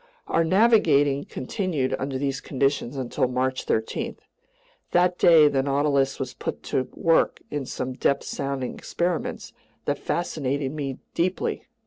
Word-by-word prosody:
Our 165 Hz, -, +2 dB
navigating 160 Hz, -8 st, +4 dB
continued 145 Hz, -2 st, -2 dB
under 135 Hz, 0 st, -2 dB
these 135 Hz, 0 st, -2 dB
conditions 135 Hz, -1 st, -1 dB
until 130 Hz, 0 st, 0 dB
March 130 Hz, +1 st, -1 dB
13. 110 Hz, 0 st, -2 dB, 0.8 s
That 180 Hz, 0 st, +3 dB
day 160 Hz, -3 st, +7 dB
the 140 Hz, -2 st, +2 dB
Nautilus 140 Hz, 0 st, +1 dB
was 130 Hz, -2 st, -4 dB
put -, -, -5 dB
to 130 Hz, -, +1 dB
work 165 Hz, -1 st, +2 dB
in 145 Hz, -3 st, -3 dB
some 130 Hz, 0 st, -4 dB
depth 140 Hz, +2 st, +1 dB
sounding 135 Hz, -2 st, -3 dB
experiments 175 Hz, -1 st, -3 dB, 0.3 s
that -, -, -1 dB
fascinated 140 Hz, -5 st, -2 dB
me 140 Hz, -3 st, -4 dB, 0.2 s
deeply. 180 Hz, +2 st, -1 dB
140 Hz, 130 wpm, -25 LUFS, 130-165 Hz, 0.8 s, day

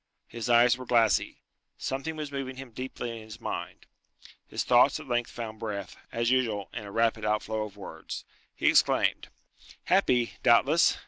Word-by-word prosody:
His 115 Hz, 0 st, -5 dB
eyes 120 Hz, +1 st, +5 dB
were 130 Hz, -, -7 dB
glassy. 115 Hz, -4 st, +2 dB, 0.3 s
Something 135 Hz, +4 st, -3 dB
was 150 Hz, -2 st, -5 dB
moving 135 Hz, -2 st, -4 dB
him 130 Hz, -2 st, -9 dB
deeply 125 Hz, 0 st, -5 dB
in 115 Hz, -1 st, -7 dB
his 110 Hz, +1 st, -11 dB
mind. -, -, -5 dB, 0.6 s
His -, -, -2 dB
thoughts 125 Hz, +4 st, +4 dB
at 155 Hz, -, -11 dB
length 120 Hz, -1 st, 0 dB
found 110 Hz, -2 st, -7 dB
breath, 100 Hz, -4 st, -5 dB, 0.2 s
as 115 Hz, +1 st, 0 dB
usual, 115 Hz, -6 st, 0 dB
in 115 Hz, -3 st, -5 dB
a 100 Hz, -, -8 dB
rapid 115 Hz, 0 st, +1 dB
outflow 105 Hz, 0 st, -1 dB
of 105 Hz, -1 st, -12 dB
words. 80 Hz, -5 st, -8 dB, 0.3 s
He -, -, 0 dB
exclaimed, -, -, +3 dB, 0.6 s
"Happy, 120 Hz, -2 st, +2 dB
doubtless! 140 Hz, +8 st, +4 dB
115 Hz, 165 wpm, -28 LUFS, 110-130 Hz, 0.6 s, eyes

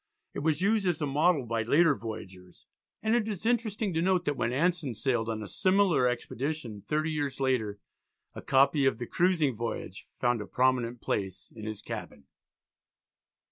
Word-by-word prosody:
It -, -, -4 dB
was 155 Hz, +3 st, 0 dB
used 210 Hz, -1 st, +2 dB
as 175 Hz, -4 st, +1 dB
a 150 Hz, -, 0 dB
model 150 Hz, 0 st, +2 dB
by 115 Hz, 0 st, -1 dB
later 145 Hz, +8 st, +4 dB
voyagers, 95 Hz, -7 st, -9 dB, 0.4 s
and 220 Hz, 0 st, +2 dB
it 230 Hz, -3 st, +1 dB
is 210 Hz, -1 st, -5 dB
interesting 220 Hz, -4 st, 0 dB
to 160 Hz, -, +1 dB
note 185 Hz, 0 st, +2 dB
that 145 Hz, -, 0 dB
when 120 Hz, -2 st, -1 dB
Anson 150 Hz, -2 st, 0 dB
sailed 120 Hz, -2 st, 0 dB
on 110 Hz, -1 st, -3 dB
a -, -, -7 dB
similar 185 Hz, -, +3 dB
expedition 125 Hz, -2 st, -3 dB
thirty 155 Hz, +9 st, -1 dB
years 145 Hz, -3 st, -2 dB
later 125 Hz, -6 st, 0 dB, 0.6 s
a -, -, -8 dB
copy 140 Hz, +1 st, +3 dB
of -, -, +1 dB
the 120 Hz, -, -4 dB
"Cruising 165 Hz, -4 st, +2 dB
Voyage," 115 Hz, +1 st, -5 dB
found 120 Hz, -2 st, +1 dB
a 105 Hz, -, -7 dB
prominent 125 Hz, -1 st, +1 dB
place 95 Hz, -2 st, -3 dB
in 110 Hz, -1 st, -8 dB
his 110 Hz, -2 st, -6 dB
cabin. 70 Hz, -, -7 dB
135 Hz, 175 wpm, -29 LUFS, 115-175 Hz, 0.6 s, later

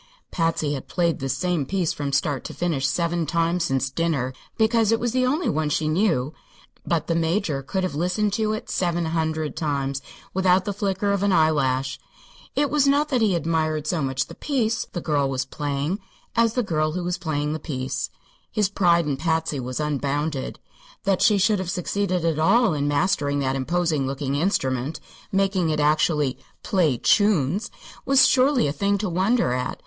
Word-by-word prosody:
Patsy 165 Hz, -3 st, 0 dB
had 135 Hz, -, -6 dB
played 170 Hz, -2 st, 0 dB
this 135 Hz, 0 st, -2 dB
same 180 Hz, -4 st, 0 dB
piece 175 Hz, +3 st, -1 dB
from 145 Hz, -3 st, -3 dB
start 140 Hz, -1 st, 0 dB
to -, -, -7 dB
finish 155 Hz, -6 st, 0 dB
seven 170 Hz, +3 st, 0 dB
times 170 Hz, +2 st, +1 dB
since 135 Hz, -3 st, 0 dB
dinner, 140 Hz, -5 st, -1 dB, 0.2 s
because 225 Hz, -1 st, +3 dB
it 225 Hz, -, +2 dB
was 240 Hz, -1 st, -1 dB
the 255 Hz, +1 st, +1 dB
only 300 Hz, +7 st, 0 dB
one 155 Hz, 0 st, 0 dB
she 155 Hz, +1 st, 0 dB
knew; 155 Hz, -5 st, +1 dB, 0.5 s
but 165 Hz, -2 st, 0 dB
the 165 Hz, -, 0 dB
Major 165 Hz, -3 st, 0 dB
could 190 Hz, +8 st, -2 dB
have 185 Hz, -, -2 dB
listened 180 Hz, +6 st, 0 dB
to 215 Hz, 0 st, 0 dB
it 215 Hz, -, -5 dB
seven 175 Hz, -2 st, 0 dB
hundred 160 Hz, -1 st, -1 dB
times 140 Hz, -3 st, -2 dB, 0.3 s
without 185 Hz, 0 st, +3 dB
the 205 Hz, -, -2 dB
flicker 200 Hz, 0 st, -1 dB
of 200 Hz, -1 st, 0 dB
an 200 Hz, 0 st, +2 dB
eyelash. 135 Hz, -6 st, +2 dB, 0.6 s
It 290 Hz, 0 st, +1 dB
was 290 Hz, -2 st, +3 dB
not 290 Hz, +2 st, +3 dB
that 255 Hz, -4 st, +1 dB
he 205 Hz, -5 st, +3 dB
admired 155 Hz, -2 st, 0 dB
so 160 Hz, 0 st, 0 dB
much 135 Hz, 0 st, -1 dB
the -, -, -11 dB
"piece" 230 Hz, -6 st, -1 dB
the 175 Hz, -, -4 dB
girl 145 Hz, -4 st, +1 dB
was 130 Hz, -1 st, -1 dB
playing 145 Hz, +6 st, -2 dB, 0.4 s
as 230 Hz, -1 st, +3 dB
the 250 Hz, -, +1 dB
girl 155 Hz, -5 st, 0 dB
who 180 Hz, +1 st, -3 dB
was 180 Hz, +1 st, -2 dB
playing 150 Hz, -3 st, -2 dB
the 160 Hz, -, -3 dB
"piece." 130 Hz, -4 st, -3 dB, 0.4 s
His 210 Hz, -3 st, +1 dB
pride 170 Hz, -4 st, +3 dB
in 145 Hz, -2 st, -1 dB
Patsy 160 Hz, -3 st, -1 dB
was 125 Hz, +1 st, -4 dB
unbounded. 145 Hz, -1 st, -2 dB, 0.5 s
That 195 Hz, -2 st, +1 dB
she 210 Hz, -, +5 dB
should 205 Hz, +1 st, +2 dB
have 185 Hz, -2 st, -3 dB
succeeded 185 Hz, -1 st, -1 dB
at 160 Hz, -2 st, +1 dB
all 225 Hz, +5 st, +4 dB
in 145 Hz, -1 st, -1 dB
mastering 145 Hz, -1 st, +1 dB
that 135 Hz, 0 st, 0 dB
imposing 155 Hz, 0 st, 0 dB
looking 135 Hz, 0 st, -3 dB
instrument 140 Hz, -4 st, 0 dB, 0.3 s
making 195 Hz, -3 st, +1 dB
it 155 Hz, -1 st, 0 dB
actually 150 Hz, -2 st, +2 dB, 0.2 s
"play 165 Hz, -, +2 dB
chunes" 200 Hz, -, +2 dB, 0.3 s
was 265 Hz, -1 st, +5 dB
surely 260 Hz, -, +3 dB
a 145 Hz, -, 0 dB
thing 200 Hz, +6 st, +1 dB
to 210 Hz, +1 st, -2 dB
wonder 185 Hz, -, +1 dB
at. 125 Hz, 0 st, -3 dB
165 Hz, 185 wpm, -24 LUFS, 145-195 Hz, 0.6 s, she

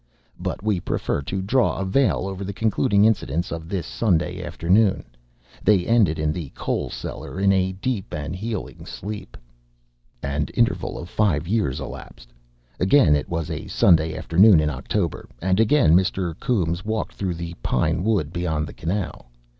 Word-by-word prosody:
But -, -, -4 dB
we 105 Hz, -4 st, +1 dB
prefer 70 Hz, -, -2 dB
to 95 Hz, +7 st, -3 dB
draw 125 Hz, +6 st, +2 dB
a 95 Hz, -, -2 dB
veil 130 Hz, +5 st, +2 dB
over 95 Hz, 0 st, -5 dB
the 100 Hz, +1 st, -4 dB
concluding 105 Hz, -2 st, +3 dB
incidents 85 Hz, -7 st, 0 dB
of 80 Hz, -1 st, -6 dB
this 95 Hz, -3 st, -2 dB
Sunday 90 Hz, -4 st, 0 dB
afternoon. 90 Hz, +4 st, +2 dB, 0.6 s
They 95 Hz, -3 st, +4 dB
ended 110 Hz, -9 st, +3 dB
in 75 Hz, 0 st, 0 dB
the 80 Hz, -5 st, -5 dB
coal -, -, -2 dB
cellar, -, -, -6 dB
in 100 Hz, 0 st, +4 dB
a 95 Hz, 0 st, +1 dB
deep 100 Hz, +1 st, -3 dB
and 75 Hz, +3 st, -4 dB
healing 105 Hz, +1 st, -5 dB
sleep. 105 Hz, -, -7 dB, 0.9 s
An 70 Hz, +1 st, -1 dB
interval -, -, +1 dB
of 85 Hz, -, -7 dB
five 90 Hz, -5 st, +1 dB
years 105 Hz, -, 0 dB
elapsed. -, -, -9 dB, 0.5 s
Again 95 Hz, -, +5 dB
it 75 Hz, -, -2 dB
was 85 Hz, -1 st, -3 dB
a 80 Hz, -, -5 dB
Sunday 80 Hz, -4 st, +3 dB
afternoon 95 Hz, +1 st, +5 dB
in 75 Hz, 0 st, +1 dB
October, 80 Hz, +6 st, -3 dB
and 95 Hz, +3 st, +1 dB
again 115 Hz, -, +4 dB
Mr. 95 Hz, -1 st, +1 dB
Coombes 90 Hz, -9 st, 0 dB
walked 110 Hz, +1 st, -2 dB
through 95 Hz, -3 st, -3 dB
the 85 Hz, 0 st, -6 dB
pine 65 Hz, +7 st, 0 dB
wood 95 Hz, -8 st, 0 dB
beyond 80 Hz, -4 st, -1 dB
the -, -, -9 dB
canal. 85 Hz, -6 st, -4 dB
90 Hz, 160 wpm, -23 LUFS, 80-105 Hz, 0.9 s, Again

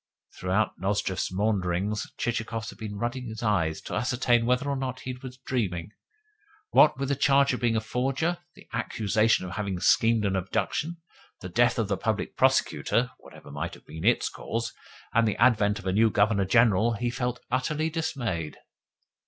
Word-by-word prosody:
Throughout 95 Hz, +3 st, 0 dB
Nozdrev's 95 Hz, -1 st, -1 dB
maunderings 100 Hz, 0 st, -1 dB
Chichikov 115 Hz, -1 st, -2 dB
had -, -, -9 dB
been 105 Hz, -2 st, -6 dB
rubbing 120 Hz, +3 st, -3 dB
his 110 Hz, 0 st, -7 dB
eyes 85 Hz, -8 st, +1 dB
to -, -, -8 dB
ascertain 120 Hz, +1 st, +1 dB
whether 125 Hz, +3 st, +1 dB
or 140 Hz, -, 0 dB
not 130 Hz, -1 st, -4 dB
he 130 Hz, -, -4 dB
was 125 Hz, 0 st, -9 dB
dreaming. 105 Hz, -9 st, -2 dB, 0.8 s
What 150 Hz, -3 st, +6 dB
with 140 Hz, 0 st, -2 dB
the 140 Hz, -, +2 dB
charge 140 Hz, 0 st, +4 dB
of 125 Hz, -, -2 dB
being 120 Hz, -2 st, +1 dB
a -, -, +3 dB
forger, 135 Hz, +9 st, -1 dB, 0.2 s
the -, -, -16 dB
accusation 110 Hz, -1 st, +1 dB
of 90 Hz, -, -6 dB
having 100 Hz, -4 st, -2 dB
schemed 115 Hz, +3 st, +3 dB
an 95 Hz, -1 st, +1 dB
abduction, 145 Hz, -, -2 dB, 0.4 s
the 90 Hz, -, -6 dB
death 120 Hz, +6 st, +3 dB
of 115 Hz, -3 st, 0 dB
the 100 Hz, -1 st, -1 dB
Public 110 Hz, 0 st, -2 dB
Prosecutor 125 Hz, +1 st, +2 dB
(whatever -, -, -14 dB
might -, -, -4 dB
have -, -, -18 dB
been 80 Hz, +1 st, -8 dB
its -, -, +3 dB
cause), -, -, -4 dB, 0.4 s
and 115 Hz, -1 st, +4 dB
the 105 Hz, -, -1 dB
advent 105 Hz, -4 st, +4 dB
of 95 Hz, -, -10 dB
a 95 Hz, -, 0 dB
new 110 Hz, +3 st, +4 dB
Governor 100 Hz, -1 st, +2 dB
General, 115 Hz, +1 st, +4 dB
he 120 Hz, +1 st, -2 dB
felt 125 Hz, 0 st, -2 dB
utterly 150 Hz, +5 st, 0 dB
dismayed. 120 Hz, -, -3 dB
115 Hz, 175 wpm, -27 LUFS, 100-125 Hz, 0.8 s, What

